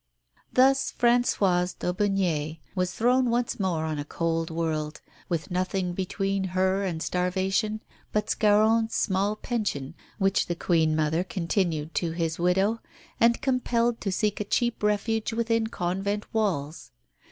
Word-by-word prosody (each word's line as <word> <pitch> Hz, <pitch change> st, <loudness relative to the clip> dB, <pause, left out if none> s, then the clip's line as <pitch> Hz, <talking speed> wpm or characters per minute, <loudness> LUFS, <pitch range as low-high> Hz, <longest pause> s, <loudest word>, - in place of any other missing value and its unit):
Thus 270 Hz, +1 st, +4 dB
Françoise 200 Hz, -7 st, +2 dB
d'Aubigné 180 Hz, -5 st, 0 dB, 0.2 s
was 185 Hz, -1 st, 0 dB
thrown 250 Hz, +5 st, +2 dB
once 240 Hz, -1 st, 0 dB
more 175 Hz, -5 st, 0 dB
on 155 Hz, -2 st, -2 dB
a -, -, -2 dB
cold 165 Hz, +2 st, -2 dB
world, 160 Hz, -2 st, -2 dB, 0.3 s
with 170 Hz, 0 st, -2 dB
nothing 185 Hz, 0 st, -1 dB
between 195 Hz, +1 st, -1 dB
her 190 Hz, +1 st, +2 dB
and 170 Hz, -4 st, -2 dB
starvation 190 Hz, +4 st, 0 dB, 0.3 s
but 210 Hz, 0 st, 0 dB
Scarron's 220 Hz, +2 st, +3 dB
small 200 Hz, +1 st, +1 dB
pension, 205 Hz, -, -3 dB, 0.2 s
which 195 Hz, -1 st, +2 dB
the 175 Hz, -, -2 dB
Queen 160 Hz, -2 st, +2 dB
mother 160 Hz, +2 st, +1 dB
continued 170 Hz, -4 st, -1 dB
to 165 Hz, -2 st, -1 dB
his 165 Hz, -1 st, -2 dB
widow, 190 Hz, +6 st, +2 dB, 0.4 s
and 235 Hz, +2 st, +3 dB
compelled 240 Hz, -3 st, +1 dB
to 195 Hz, -, -1 dB
seek 210 Hz, +2 st, 0 dB
a -, -, 0 dB
cheap 240 Hz, +3 st, 0 dB
refuge 215 Hz, +2 st, 0 dB
within 230 Hz, -1 st, +1 dB
convent 200 Hz, +1 st, -2 dB
walls. 170 Hz, -9 st, -1 dB
190 Hz, 135 wpm, -26 LUFS, 170-220 Hz, 0.4 s, Thus